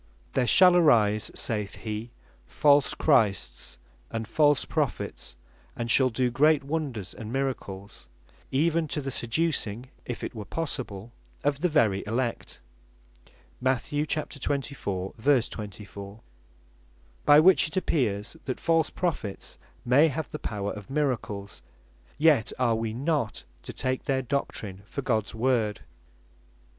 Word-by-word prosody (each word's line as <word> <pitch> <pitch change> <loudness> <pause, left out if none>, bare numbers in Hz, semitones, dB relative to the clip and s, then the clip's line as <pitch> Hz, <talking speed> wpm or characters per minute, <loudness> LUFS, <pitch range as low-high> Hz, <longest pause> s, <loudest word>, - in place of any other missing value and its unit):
"There 125 - +1
shall 180 +4 +7
arise," 110 - +4
(saith 105 -3 -1
he) 110 +1 -5 0.4
"false 145 -2 +3
Christs, 105 - +1 0.3
and 115 -1 -4
false 145 +3 +3
Prophets, - - -3 0.4
and 115 0 -2
shall 130 0 +5
doe 125 +1 0
great 150 +3 +4
wonders 140 - -3
and 110 0 -8
miracles, 110 - -4 0.4
even 160 +3 +1
to 150 - -2
the 135 -1 -4
seducing 125 -3 -1
(if 120 - -6
it - - -4
were 110 -3 -6
possible) 120 -8 -4 0.3
of 140 0 0
the 180 - +2
very 110 -11 +2
Elect." 120 +2 -2 1.0
(Mat. 130 +3 0
24. 140 -9 -2
24) 105 -5 -2 1.0
By 145 +1 +7
which 180 +1 +6
it 155 - -6
appears, 110 - 0
that 130 - -3
false 165 -2 +2
Prophets 150 - -3 0.3
may 135 +6 +6
have 160 +1 -3
the 150 - -5
power 100 -2 -3
of 105 -2 -10
miracles; 125 -8 -2 0.6
yet 150 -7 +4
are 125 -2 +2
wee 110 0 -1
not 140 -4 -1 0.2
to - - -7
take 130 0 -2
their 135 -2 0
doctrin 110 -7 -3
for 140 +5 -5
Gods 110 -5 0
Word. 115 -3 +1
130 Hz, 125 wpm, -27 LUFS, 110-145 Hz, 1.0 s, shall